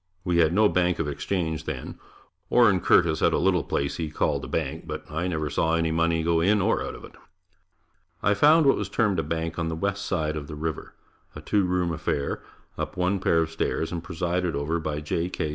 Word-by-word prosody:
We 90 -2 +1
had 80 -2 +4
no 105 +4 +4
bank 90 -2 +1
of 80 - -1
exchange 80 +1 -2
then. - - -6 0.5
Orin 110 -6 +5
Curtis 80 -3 +3
had - - +3
a - - +3
little - - +2
place 70 - -2
he 80 -2 -3
called 75 - -1
a - - -5
bank, 80 +1 -3
but 75 0 -5
I 80 +4 -2
never 80 -4 -2
saw 80 +1 +1
money 80 0 +1
go 85 0 +2
in 105 +4 +3
or 95 - +1
out - - -5
of - - -10
it. - - -14 1.1
I 100 - +4
found 150 +9 +5
what 135 - +5
was - - -3
termed 105 -6 +1
a - - 0
bank 80 0 -3
on 80 - -1
the 80 - -2
west 100 +3 -2
side 80 -4 -1
of 75 -2 -5
the 75 - -7
river 80 0 -5 0.4
a - - -7
two 100 -2 +1
room 90 -1 0
affair, 75 -3 -2 0.4
up - - -4
one 90 +2 +1
pair 85 -3 +2
of 80 - -6
stairs, 80 0 -2
and 85 -1 -4
presided 90 0 -2
over 75 +4 -1
by 75 -2 -3
J. 85 +3 -2
K. 80 - -3
85 Hz, 220 wpm, -26 LUFS, 80-90 Hz, 1.1 s, Orin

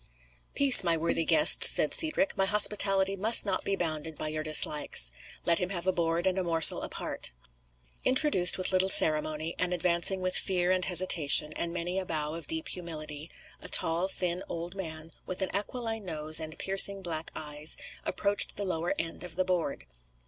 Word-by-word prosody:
"Peace, 275 -6 +6
my 170 -2 0
worthy 165 +1 -3
guests," 305 - +6
said - - +1
Cedric; 310 -2 +1
"my 195 - 0
hospitality 195 -2 +1
must 215 +4 +2
not 200 - -2
be 200 - -3
bounded 160 -3 -4
by 155 - -3
your 155 0 -5
dislikes. 150 - +3 0.3
Let 170 -1 +1
him 180 - -4
have 175 -3 -5
a 190 - 0
board 170 -1 -3
and 190 0 -2
a - - -3
morsel 165 -2 +5
apart." - - -6 0.7
Introduced 255 - +3
with 185 - +1
little 185 0 +2
ceremony, 155 -1 0
and 180 0 -2
advancing 175 +2 0
with 185 0 -3
fear 180 -1 -1
and 185 -1 -2
hesitation, 165 -4 +4
and 170 - -5
many 175 +2 -5
a 190 - -7
bow 155 -1 -5
of 165 0 -9
deep 320 0 -4
humility, 155 -3 -6 0.3
a - - -11
tall 170 +3 +2
thin 180 -2 -4
old 170 +1 -8
man, 160 -4 -8 0.2
with 185 +1 -3
an 190 - -6
aquiline 225 +1 -4
nose 155 -3 -1
and 155 0 -9
piercing 195 0 +4
black 165 -2 -6
eyes, 150 0 -1 0.3
approached 200 +2 -1
the 200 - -2
lower 170 -2 -4
end 165 +1 -5
of 180 -2 -8
the 185 +1 -3
board. 180 -6 -4
175 Hz, 180 wpm, -26 LUFS, 160-190 Hz, 0.7 s, Peace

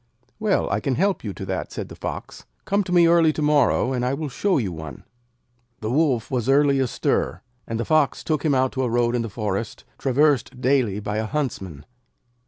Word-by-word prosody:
'Well, - - +1
I 100 - +1
can 130 +4 -1
help 195 +5 +1
you 105 - -3
to 95 - -7
that,' 95 -1 -4
said - - -5
the - - -9
Fox. - - -7 0.2
'Come 200 +1 +1
to 180 - -6
me 175 -1 +6
early 165 -1 +5
to 155 - -4
morrow, 145 -3 +3
and 125 -1 -1
I 125 +2 0
will 150 0 -4
show 190 +8 +1
you 105 -9 -1
one!' 80 -2 -8 0.8
The 110 +1 -2
Wolf 135 -5 +1
was 125 -1 -1
early 140 0 +4
astir, 115 -8 -1 0.2
and 115 0 -3
the 120 - -1
Fox 155 -4 +2
took 155 -3 -1
him 150 -4 +2
out 130 0 +2
to 130 - -2
a 125 - 0
road 120 +1 +1
in 120 - +1
the 115 - -4
forest, 105 0 -4 0.2
traversed 135 -1 +1
daily 125 -6 +1
by 105 0 -3
a 110 - -2
Huntsman. 100 - -4
130 Hz, 210 wpm, -23 LUFS, 110-150 Hz, 0.8 s, me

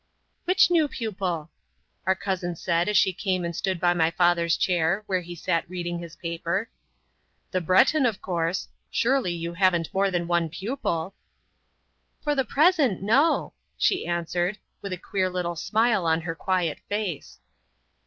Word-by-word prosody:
"Which 365 0 +4
new 325 -3 +4
pupil?" 185 - -3 0.6
our 190 - +4
cousin 185 -2 -3
said 170 +2 0
as 210 - +3
she 190 - +4
came 185 -1 -1
and 170 -1 -4
stood 185 0 -1
by 175 0 +3
my 165 -2 +2
father's 170 -1 +2
chair, 180 +3 +1
where 185 -3 0
he 175 0 -8
sat 170 0 -1
reading 175 -1 -4
his 170 -2 -9
paper. 170 +6 -3 0.8
"The 185 - 0
Breton, 250 - +4
of 220 -5 -2
course. 170 0 -2 0.2
Surely 255 -6 +1
you 170 0 -4
haven't 175 -2 +1
more 195 +1 +2
than 175 -2 -1
one 170 -1 +1
pupil?" 190 - -3 1.1
"For 295 - +1
the 270 -2 +1
present, 285 - +3
no!" 270 +11 +3 0.2
she 380 - +1
answered, 175 +3 -1 0.2
with 200 - -6
a 185 - -2
queer 185 +1 -1
little 180 -1 -2
smile 215 +1 +1
on 160 0 +2
her 165 0 -3
quiet 175 -2 -1
face. 205 -7 -3
180 Hz, 155 wpm, -25 LUFS, 170-205 Hz, 1.1 s, Which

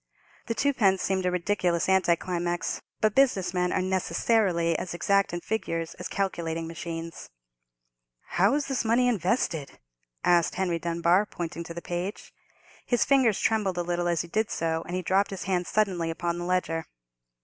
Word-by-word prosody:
The 230 - -1
twopence 215 -10 +2
seemed 190 -1 0
a - - +1
ridiculous 180 -1 0
anti 190 -2 +4
climax; 175 0 -2 0.2
but 215 -1 +3
business 245 -10 +3
men 180 0 +1
are 185 - +1
necessarily 185 -2 +1
as 175 -2 -5
exact 200 +2 +2
in 175 0 -4
figures 165 -7 -3
as - - -4
calculating 165 -4 -2
machines. 165 0 -6 1.0
"How 195 - +3
is 290 -1 0
this 270 -3 -1
money 235 +2 +3
invested?" 180 - 0 0.5
asked 175 -2 +3
Henry 180 -3 0
Dunbar, 170 +4 +2
pointing 170 -2 -5
to 170 - -8
the 170 - -6
page. 180 +4 -5 0.5
His 245 - +1
fingers 260 -7 +3
trembled 210 -5 +1
a 175 - 0
little 175 0 -1
as 170 -1 +1
he 170 - -7
did 215 +5 0
so, 160 0 -1
and 180 - -3
he 185 - -2
dropped 190 +3 +2
his 195 -2 -5
hand 180 -2 -1
suddenly 185 -6 +1
upon 170 +1 -2
the 175 - -4
ledger. 170 -3 0
180 Hz, 170 wpm, -27 LUFS, 170-200 Hz, 1.0 s, anti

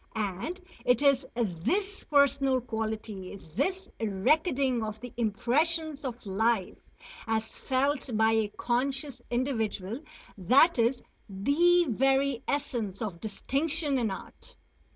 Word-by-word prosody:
And 215 - -3 0.2
it 250 +3 +3
is 275 -2 +3
this 245 - -1
personal 280 -2 +3
quality, 220 -5 -4 0.2
this 370 - -1
recording 255 - +1
of 215 0 -5
the 245 +1 -9
impressions 285 +8 0
of 245 -3 -6
life 205 0 +1 0.5
as 220 0 -2
felt 270 +1 0
by 220 0 +4
a 220 -1 +2
conscious 265 +5 -2
individual 235 -4 -1 0.4
that 260 - +5
is 240 +2 +2 0.3
the 335 - +3
very 270 +1 +2
essence 240 -9 -2
of 200 -7 -4
distinction 280 - 0
in 230 -3 0
art. 190 - -9
250 Hz, 110 wpm, -29 LUFS, 220-280 Hz, 0.5 s, that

